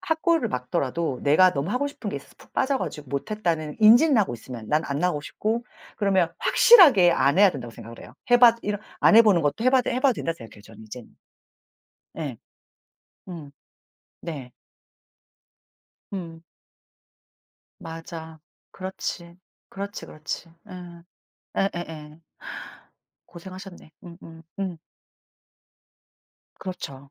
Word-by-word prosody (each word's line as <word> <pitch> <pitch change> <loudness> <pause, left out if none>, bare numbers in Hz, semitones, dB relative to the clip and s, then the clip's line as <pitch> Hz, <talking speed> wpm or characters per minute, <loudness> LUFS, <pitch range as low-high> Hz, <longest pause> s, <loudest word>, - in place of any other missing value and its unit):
학고를 320 -5 +1
맞더라도 130 +2 -2
내가 180 +6 +5
너무 145 +7 -2
하고 285 +4 0
싶은 285 - -7
게 - - -4
있어서 - - -12
푹 - - -19
빠져 265 0 +1
가지고 150 -3 -6
못 140 +9 -4
했다는 165 -7 -2
인지는 240 +6 +7
하고 190 - +1
있으면 115 -2 -9
난 150 +1 +1
안 140 0 -2
나오고 175 -4 0
싶고 225 +9 -2 0.3
그러면 190 -5 +1
확실하게 295 - +7
안 140 +2 +2
해야 205 -2 +7
된다고 120 -7 -8
생각을 115 0 -11
해요. - - -13 0.2
해 245 - +8
봐 235 -2 +8
이런 205 0 -2 0.2
안 220 - +6
해 230 - +10
보는 195 -7 +4
것도 150 +10 -1
해 255 - +5
봐도 260 -2 +2
해 250 - 0
봐도 265 -1 +4
된다고 165 -5 -3
생각해요, 110 -5 -13
저는 110 0 -14
이제는. 115 +2 -11 1.0
예. 145 -7 -4 0.9
음. 160 -6 -9 0.7
네. 140 -7 -7 1.6
음. 165 -4 -7 1.4
맞아. 160 -1 -9 0.3
그렇지. 185 -2 -6 0.3
그렇지, 200 +1 -6
그렇지. 155 +3 -6 0.2
음. 175 -3 -11 0.5
예예예. 165 -5 -4 1.1
고생하셨네. 185 0 -11
음음음. 170 +1 -8 1.8
그렇죠. 140 -7 -8
170 Hz, 265 characters per minute, -25 LUFS, 150-205 Hz, 1.8 s, 해